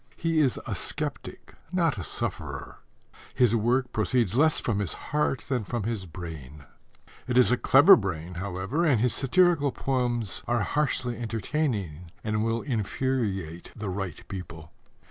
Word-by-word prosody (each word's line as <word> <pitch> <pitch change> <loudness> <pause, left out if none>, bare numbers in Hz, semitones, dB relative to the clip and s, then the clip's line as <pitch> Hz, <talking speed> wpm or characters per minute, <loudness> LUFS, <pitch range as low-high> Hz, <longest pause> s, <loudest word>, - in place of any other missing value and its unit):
He 165 -1 +1
is 135 -5 +2
a - - -3
sceptic, - - -4 0.2
not 165 - +1
a - - -4
sufferer. - - -4 0.6
His 120 -3 +4
work 125 +3 +1
proceeds 110 -2 +1
less 155 +5 +4
from 105 -4 -1
his 100 -5 -2
heart 140 -5 -1
than 125 -5 -1
from 115 +2 -3
his 105 -4 -3
brain. 75 -4 -9 0.6
It 125 -1 0
is 125 -1 +6
a - - +5
clever 140 +9 +7
brain, 90 -4 -4
however, 95 - -2
and 145 -9 +3
his 125 +2 +2
satirical 150 0 +3
poems 120 -5 -1
are 120 -2 +1
harshly 130 -3 0
entertaining 110 - -2
and 110 -1 0
will 115 +1 -1
infuriate 105 - -2
the 105 -2 -4
right 95 -1 -5
people. 85 -4 -8
115 Hz, 145 wpm, -27 LUFS, 95-135 Hz, 0.6 s, clever